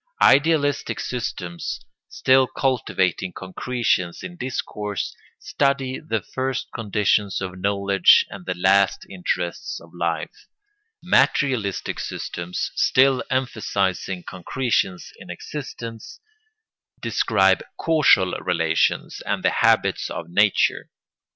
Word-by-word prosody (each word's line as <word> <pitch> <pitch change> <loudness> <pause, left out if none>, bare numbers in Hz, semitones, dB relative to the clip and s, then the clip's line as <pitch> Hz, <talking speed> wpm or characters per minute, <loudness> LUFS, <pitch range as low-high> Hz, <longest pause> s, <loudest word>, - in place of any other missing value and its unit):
Idealistic 145 0 +3
systems, 90 -8 -4 0.3
still 130 0 +3
cultivating 95 - -1
concretions 95 -2 -2
in 175 - -7
discourse, 105 - -4 0.2
study 135 -2 -1
the 115 -9 -3
first 130 -1 -3
conditions 105 -2 0
of 95 -1 -6
knowledge 100 -1 +4
and 95 -2 -10
the 90 - -1
last 95 +2 +3
interests 90 -2 -3
of 85 - -17
life; 85 -2 -4 0.6
materialistic 120 -9 +1
systems, 85 +1 -4
still 130 0 +3
emphasising 100 -8 -1
concretions 95 0 -2
in - - -12
existence, 115 -6 -8 0.8
describe - - +2 0.2
causal 150 - +4
relations, 80 -3 0
and - - -1
the - - +3
habits - - +2
of 80 - -6
nature. 100 +2 +2
100 Hz, 95 wpm, -23 LUFS, 90-130 Hz, 0.8 s, knowledge